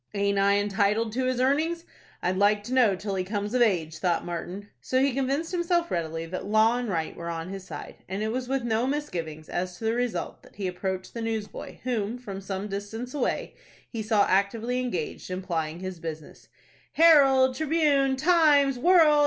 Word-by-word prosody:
"Aint 200 Hz, 0 st, +1 dB
I 200 Hz, +1 st, +4 dB
entitled 210 Hz, +2 st, +1 dB
to 255 Hz, +2 st, 0 dB
his 255 Hz, -1 st, 0 dB
earnings, 315 Hz, +6 st, +1 dB, 0.4 s
I'd 180 Hz, +1 st, +1 dB
like 205 Hz, +2 st, +3 dB
to 245 Hz, -, -5 dB
know 240 Hz, -7 st, +4 dB
till 200 Hz, +2 st, -4 dB
he 185 Hz, -1 st, -1 dB
comes 205 Hz, +2 st, -3 dB
of 250 Hz, -, +2 dB
age?" 165 Hz, -8 st, +1 dB
thought 175 Hz, -3 st, 0 dB
Martin. 180 Hz, +3 st, -5 dB
So 260 Hz, -, 0 dB
he 275 Hz, 0 st, +2 dB
convinced 275 Hz, +5 st, -1 dB
himself 345 Hz, -1 st, 0 dB
readily 165 Hz, -1 st, -2 dB
that 185 Hz, +3 st, -5 dB
law 220 Hz, +3 st, +4 dB
and 245 Hz, -2 st, -3 dB
right 165 Hz, -4 st, -2 dB
were 170 Hz, 0 st, -6 dB
on 165 Hz, +1 st, -4 dB
his 195 Hz, -1 st, -7 dB
side, -, -, -8 dB
and 195 Hz, +3 st, -2 dB
it 220 Hz, -, -1 dB
was 250 Hz, +1 st, -3 dB
with 270 Hz, -2 st, 0 dB
no 235 Hz, +1 st, +1 dB
misgivings 170 Hz, -, -4 dB
as 180 Hz, 0 st, -3 dB
to -, -, -11 dB
the 220 Hz, -, +2 dB
result 245 Hz, -1 st, -2 dB
that -, -, -19 dB
he 200 Hz, -, -4 dB
approached 185 Hz, +1 st, -3 dB
the 230 Hz, -, -5 dB
newsboy 225 Hz, -2 st, -5 dB
whom, 235 Hz, -2 st, -1 dB
from 200 Hz, -6 st, -7 dB
some 195 Hz, +1 st, -4 dB
distance 210 Hz, +5 st, -5 dB
away, 285 Hz, -4 st, -1 dB, 0.4 s
he 230 Hz, -, -3 dB
saw 215 Hz, -1 st, +3 dB
actively 220 Hz, +6 st, +1 dB
engaged 185 Hz, -13 st, -4 dB
in 185 Hz, +1 st, -4 dB
plying 165 Hz, -2 st, -3 dB
his 185 Hz, -2 st, -5 dB
business. 160 Hz, -2 st, -8 dB, 0.5 s
"'Herald,' 275 Hz, -5 st, +6 dB
'Tribune,' 290 Hz, -3 st, +2 dB
'Times,' 290 Hz, -4 st, +4 dB
'World'!" 320 Hz, -2 st, +6 dB
220 Hz, 195 wpm, -27 LUFS, 190-260 Hz, 0.5 s, Herald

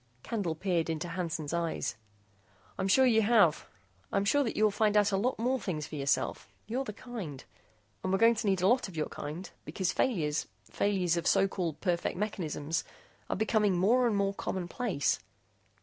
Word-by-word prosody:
Candle 195 Hz, -8 st, -2 dB
peered 170 Hz, -1 st, 0 dB
into 165 Hz, +2 st, -3 dB
Hansen's 165 Hz, -3 st, -3 dB
eyes. 170 Hz, -1 st, -1 dB, 0.8 s
"I'm 190 Hz, -, 0 dB
sure 260 Hz, +7 st, +5 dB
you 225 Hz, -3 st, +4 dB
have. 205 Hz, -8 st, +4 dB, 0.4 s
I'm 195 Hz, -, +1 dB
sure 285 Hz, +7 st, +3 dB
that 230 Hz, -, -3 dB
you 215 Hz, -, +2 dB
will 215 Hz, -, +5 dB
find 210 Hz, 0 st, +2 dB
out 205 Hz, 0 st, +4 dB
a -, -, +2 dB
lot 235 Hz, +7 st, 0 dB
more 255 Hz, +3 st, 0 dB
things 165 Hz, -8 st, -3 dB
for -, -, -13 dB
yourself. 140 Hz, -1 st, -1 dB, 0.2 s
You're 255 Hz, +5 st, -2 dB
the 210 Hz, -, -4 dB
kind. 200 Hz, -, -7 dB, 0.6 s
And 185 Hz, -, -1 dB
we're 195 Hz, -, +3 dB
going 230 Hz, +3 st, +6 dB
to 225 Hz, -1 st, -3 dB
need 190 Hz, -2 st, +1 dB
a -, -, +5 dB
lot 250 Hz, +1 st, +3 dB
of 180 Hz, -4 st, -10 dB
your 155 Hz, -, -1 dB
kind, 155 Hz, +6 st, -6 dB, 0.2 s
because 190 Hz, -1 st, -2 dB
failures 155 Hz, -, 0 dB, 0.2 s
failures 185 Hz, -4 st, 0 dB
of 170 Hz, -, -1 dB
so 195 Hz, -, +4 dB
called 175 Hz, -6 st, -3 dB
perfect 175 Hz, -2 st, -1 dB
mechanisms 165 Hz, -6 st, -2 dB, 0.5 s
are -, -, 0 dB
becoming 210 Hz, -2 st, +2 dB
more 240 Hz, +7 st, +4 dB
and 220 Hz, -, +1 dB
more 200 Hz, 0 st, +1 dB
commonplace." 190 Hz, -, -1 dB
195 Hz, 185 wpm, -30 LUFS, 170-220 Hz, 0.8 s, going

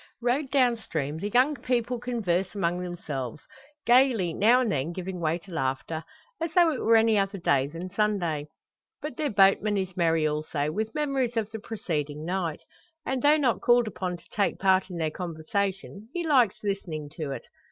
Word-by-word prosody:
Rowed 250 Hz, +4 st, 0 dB
down 255 Hz, -4 st, +3 dB
stream, 155 Hz, -7 st, -4 dB
the 205 Hz, -, -3 dB
young 255 Hz, +7 st, +4 dB
people 245 Hz, -2 st, -1 dB
converse 205 Hz, -7 st, -1 dB
among 175 Hz, -2 st, 0 dB
themselves; 150 Hz, -8 st, -5 dB, 0.4 s
gaily, 240 Hz, -8 st, +4 dB
now 230 Hz, +8 st, +5 dB
and 235 Hz, -4 st, 0 dB
then 145 Hz, 0 st, -1 dB
giving 185 Hz, 0 st, -5 dB
way 165 Hz, 0 st, 0 dB
to 185 Hz, +2 st, -15 dB
laughter, 145 Hz, +2 st, -2 dB, 0.4 s
as 330 Hz, -1 st, -1 dB
though 345 Hz, -2 st, +6 dB
it 265 Hz, -, -3 dB
were 230 Hz, -, +4 dB
any 225 Hz, -1 st, +4 dB
other 195 Hz, 0 st, -1 dB
day 140 Hz, -6 st, +2 dB
than 165 Hz, +5 st, -7 dB
Sunday. 180 Hz, -8 st, 0 dB, 0.5 s
But 300 Hz, -4 st, -6 dB
their 300 Hz, 0 st, -1 dB
boatman 200 Hz, +1 st, +4 dB
is 190 Hz, -2 st, -3 dB
merry 165 Hz, -3 st, +2 dB
also, 150 Hz, -1 st, -1 dB
with 220 Hz, -, -3 dB
memories 270 Hz, -5 st, 0 dB
of 220 Hz, -1 st, -1 dB
the 220 Hz, -, -5 dB
preceding 155 Hz, -9 st, -4 dB
night; 170 Hz, -3 st, -2 dB, 0.4 s
and, 265 Hz, -1 st, -1 dB
though 295 Hz, +3 st, +5 dB
not 265 Hz, -6 st, +1 dB
called 240 Hz, -1 st, +4 dB
upon 185 Hz, -4 st, -3 dB
to 170 Hz, -, -22 dB
take 205 Hz, -, 0 dB
part 190 Hz, 0 st, +3 dB
in 180 Hz, -, -6 dB
their 160 Hz, -2 st, -1 dB
conversation, 195 Hz, +5 st, -3 dB
he 345 Hz, -1 st, -1 dB
likes 255 Hz, -11 st, +3 dB
listening 175 Hz, -7 st, -3 dB
to 155 Hz, -3 st, -3 dB
it. 135 Hz, -, -5 dB
195 Hz, 185 wpm, -27 LUFS, 165-240 Hz, 0.5 s, though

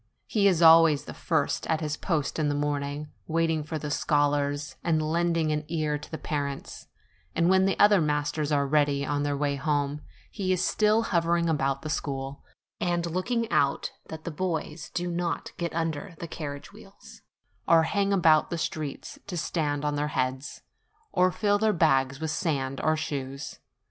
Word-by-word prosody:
he 205 Hz, -2 st, +2 dB
is 175 Hz, -3 st, +3 dB
always 160 Hz, -2 st, +7 dB
the -, -, -7 dB
first -, -, -1 dB
at 160 Hz, -1 st, +1 dB
his 150 Hz, -2 st, -2 dB
post 160 Hz, -3 st, -2 dB
in 150 Hz, -1 st, +1 dB
the 145 Hz, -, 0 dB
morning, 145 Hz, 0 st, -2 dB, 0.2 s
waiting 165 Hz, -1 st, +1 dB
for 160 Hz, +1 st, -4 dB
the 150 Hz, -1 st, -5 dB
scholars 145 Hz, -1 st, 0 dB
and 165 Hz, -2 st, +2 dB
lending 165 Hz, 0 st, +1 dB
an 150 Hz, 0 st, -1 dB
ear 155 Hz, -2 st, -1 dB
to 150 Hz, -, -8 dB
the 160 Hz, -, -5 dB
parents; 140 Hz, -3 st, -4 dB, 0.5 s
and 170 Hz, +2 st, +3 dB
when 190 Hz, 0 st, +4 dB
the 195 Hz, -, 0 dB
other 205 Hz, -3 st, +6 dB
masters 150 Hz, 0 st, -1 dB
are 145 Hz, -1 st, +3 dB
already 145 Hz, 0 st, +2 dB
on 145 Hz, 0 st, -1 dB
their 145 Hz, -1 st, -1 dB
way 140 Hz, -1 st, 0 dB
home, 145 Hz, 0 st, -1 dB, 0.3 s
he 185 Hz, -2 st, -2 dB
is 185 Hz, 0 st, +1 dB
still 215 Hz, +1 st, +3 dB
hovering 170 Hz, -3 st, +1 dB
about 135 Hz, -4 st, 0 dB
the -, -, -4 dB
school, 135 Hz, -2 st, -4 dB, 0.4 s
and 175 Hz, -1 st, 0 dB
looking 230 Hz, +7 st, -1 dB
out 140 Hz, -1 st, +1 dB, 0.2 s
that 160 Hz, 0 st, -7 dB
the 170 Hz, -, -4 dB
boys 160 Hz, -1 st, -3 dB
do 175 Hz, -, -1 dB
not 175 Hz, 0 st, -2 dB
get 170 Hz, -1 st, -2 dB
under 165 Hz, +2 st, -3 dB
the 170 Hz, -, -6 dB
carriage 145 Hz, -3 st, -7 dB
wheels, -, -, -15 dB, 0.5 s
or 165 Hz, -1 st, +6 dB
hang 200 Hz, +4 st, 0 dB
about 160 Hz, -5 st, +4 dB
the 170 Hz, -, -2 dB
streets 155 Hz, -3 st, -4 dB
to 180 Hz, -3 st, -4 dB
stand 150 Hz, -3 st, -1 dB
on 145 Hz, 0 st, 0 dB
their 145 Hz, +1 st, 0 dB
heads, 130 Hz, -1 st, -3 dB, 0.5 s
or 185 Hz, -, +3 dB
fill 205 Hz, +1 st, +1 dB
their 220 Hz, 0 st, +3 dB
bags 135 Hz, -5 st, +2 dB
with 160 Hz, -1 st, -2 dB
sand 140 Hz, -5 st, -1 dB
or 155 Hz, 0 st, +2 dB
stones. 140 Hz, -3 st, -5 dB
155 Hz, 180 wpm, -27 LUFS, 145-170 Hz, 0.5 s, always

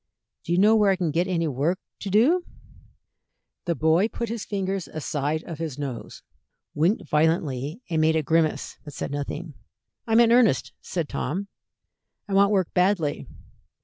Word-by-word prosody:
"Do -, -, -4 dB
you 175 Hz, -, +3 dB
know 210 Hz, +4 st, +5 dB
where 210 Hz, -2 st, +4 dB
I 195 Hz, -, +4 dB
can 175 Hz, -4 st, -1 dB
get 170 Hz, +5 st, +1 dB
any 170 Hz, -3 st, 0 dB
work 150 Hz, +6 st, 0 dB, 0.2 s
to 200 Hz, -, -5 dB
do?" 265 Hz, -, +4 dB, 1.2 s
The 170 Hz, -2 st, 0 dB
boy 160 Hz, -, +3 dB
put 235 Hz, 0 st, -5 dB
his 230 Hz, -2 st, -4 dB
fingers 195 Hz, -2 st, -2 dB
aside 155 Hz, 0 st, -2 dB
of 165 Hz, -3 st, -8 dB
his 160 Hz, -5 st, -4 dB
nose, 140 Hz, -5 st, -6 dB, 0.5 s
winked 175 Hz, +5 st, +1 dB
violently, 150 Hz, -, 0 dB
and 160 Hz, -3 st, 0 dB
made 160 Hz, 0 st, +3 dB
a 160 Hz, -, +1 dB
grimace, 160 Hz, +1 st, 0 dB
but 145 Hz, -3 st, -10 dB
said -, -, -4 dB
nothing. 145 Hz, +3 st, -5 dB, 0.5 s
"I'm 225 Hz, 0 st, +4 dB
in 235 Hz, -1 st, +5 dB
earnest," 240 Hz, -2 st, +3 dB
said 170 Hz, -4 st, -3 dB
Tom. 195 Hz, +8 st, -3 dB, 0.8 s
"I 200 Hz, -, -4 dB
want 200 Hz, +1 st, +5 dB
work 190 Hz, -4 st, +1 dB
badly." 180 Hz, -5 st, +1 dB
170 Hz, 165 wpm, -25 LUFS, 155-200 Hz, 1.2 s, know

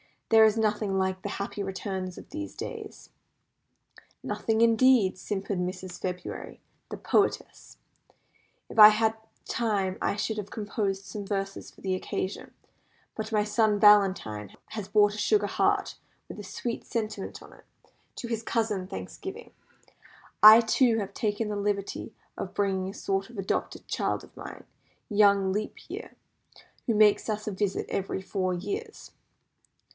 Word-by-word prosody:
"There 225 Hz, -1 st, +7 dB
is 220 Hz, 0 st, +3 dB
nothing 210 Hz, -2 st, 0 dB
like 190 Hz, 0 st, -1 dB
the 205 Hz, -, -4 dB
happy 200 Hz, +1 st, -4 dB
returns 190 Hz, -1 st, -4 dB
of -, -, -11 dB
these 310 Hz, 0 st, -6 dB
days." 440 Hz, -3 st, -8 dB, 1.1 s
"Nothing, 225 Hz, 0 st, -1 dB
indeed," 230 Hz, -4 st, +4 dB
simpered 195 Hz, -1 st, -3 dB
Mrs. 180 Hz, 0 st, -5 dB
February, 180 Hz, -1 st, -5 dB, 0.3 s
the -, -, -6 dB
poetess. 405 Hz, -, -1 dB, 0.9 s
"If -, -, -4 dB
I 210 Hz, -, +13 dB
had 220 Hz, +1 st, +3 dB
had -, -, -22 dB, 0.3 s
time 200 Hz, -5 st, -1 dB
I -, -, 0 dB
should 215 Hz, +1 st, -2 dB
have 205 Hz, -1 st, -5 dB
composed 205 Hz, -2 st, -3 dB
some 205 Hz, -1 st, -6 dB
verses 195 Hz, -1 st, -3 dB
for -, -, -20 dB
the 190 Hz, -1 st, -1 dB
occasion; 185 Hz, +1 st, -4 dB, 0.6 s
but 220 Hz, 0 st, -5 dB
my 210 Hz, -1 st, +3 dB
son 210 Hz, 0 st, +2 dB
Valentine 190 Hz, -, +4 dB
has 210 Hz, -3 st, -6 dB
brought 205 Hz, 0 st, +4 dB
a -, -, -7 dB
sugar 415 Hz, -, +2 dB
heart, -, -, 0 dB, 0.3 s
with -, -, -8 dB
a -, -, -7 dB
sweet 235 Hz, -1 st, -5 dB
sentiment 215 Hz, -3 st, -4 dB
on -, -, -15 dB
it, -, -, -19 dB, 0.5 s
to 240 Hz, -, -6 dB
his 230 Hz, -2 st, -2 dB
cousin 220 Hz, -5 st, -1 dB
Thanksgiving. 95 Hz, -, -8 dB, 0.9 s
I, 215 Hz, +2 st, +11 dB
too, 230 Hz, 0 st, +3 dB
have 200 Hz, -3 st, -4 dB
taken 215 Hz, -1 st, -1 dB
the 210 Hz, -, -2 dB
liberty 200 Hz, -1 st, -3 dB, 0.2 s
of -, -, -6 dB
bringing 190 Hz, -2 st, 0 dB
a -, -, -7 dB
sort 195 Hz, +1 st, -2 dB
of 235 Hz, -, -13 dB
adopted 195 Hz, -1 st, -3 dB
child -, -, -1 dB
of -, -, -17 dB
mine, -, -, -9 dB, 0.5 s
young 200 Hz, -2 st, +4 dB
Leap 210 Hz, +2 st, -2 dB
Year, -, -, -7 dB, 0.7 s
who 230 Hz, -, +2 dB
makes 210 Hz, +1 st, +4 dB
us 215 Hz, 0 st, -3 dB
a -, -, -1 dB
visit 195 Hz, 0 st, -1 dB
every 190 Hz, 0 st, -2 dB
four 185 Hz, -1 st, -1 dB
years." 415 Hz, -, -6 dB
205 Hz, 150 wpm, -28 LUFS, 195-220 Hz, 1.1 s, I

